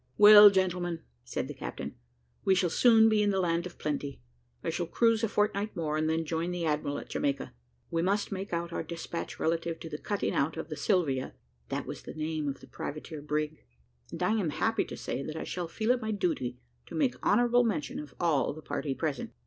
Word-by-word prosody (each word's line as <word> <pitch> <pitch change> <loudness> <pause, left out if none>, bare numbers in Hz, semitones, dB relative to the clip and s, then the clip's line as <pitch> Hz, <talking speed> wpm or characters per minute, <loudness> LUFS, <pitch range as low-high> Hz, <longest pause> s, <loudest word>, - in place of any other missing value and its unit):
"Well, 210 0 +11
gentlemen," 180 -3 0 0.2
said 60 - -3
the - - -6
captain, - - -6 0.5
"we 190 - +4
shall 180 -2 +1
soon 225 0 +6
be 215 -1 +3
in 205 - +3
the 195 -1 +1
land 170 -1 +1
of 175 - -14
plenty. 145 -2 -3 0.4
I - - -1
shall 175 - -2
cruise 230 +4 +2
a 225 - +2
fortnight 210 0 0
more, 155 -2 -1
and 155 0 +1
then 160 0 0
join 165 +2 -1
the 175 -1 -2
admiral 150 -2 0
at - - -8
Jamaica. 140 -1 -1 0.4
We 165 - +1
must 200 +3 0
make 195 0 -4
out 170 0 -2
our - - -1
despatch 170 +1 -6
relative 165 0 -1
to 165 - -6
the 150 - -4
cutting 205 -1 -1
out 150 +4 0
of 160 0 -5
the 155 - -4
Sylvia" 150 -9 0 0.3
(that - - -2
was - - -6
the - - -9
name 155 -1 -2
of 140 - -4
the - - -13
privateer 155 +1 -6
brig), 150 +1 -2 0.5
"and - - -4
I - - +3
am 210 -7 +1
happy 225 +8 0
to - - -8
say - - -3
that 155 +3 -5
I 160 - -3
shall 175 -2 -4
feel 220 +7 0
it 250 -1 +1
my 220 - -3
duty 165 - -1 0.3
to - - -8
make 275 -5 0
honourable 245 0 +4
mention 205 -11 -1
of 150 - -9
all 160 -5 +2
the 155 +1 -11
party 135 -3 -3
present. 150 -4 -3
170 Hz, 220 wpm, -30 LUFS, 155-205 Hz, 0.5 s, Well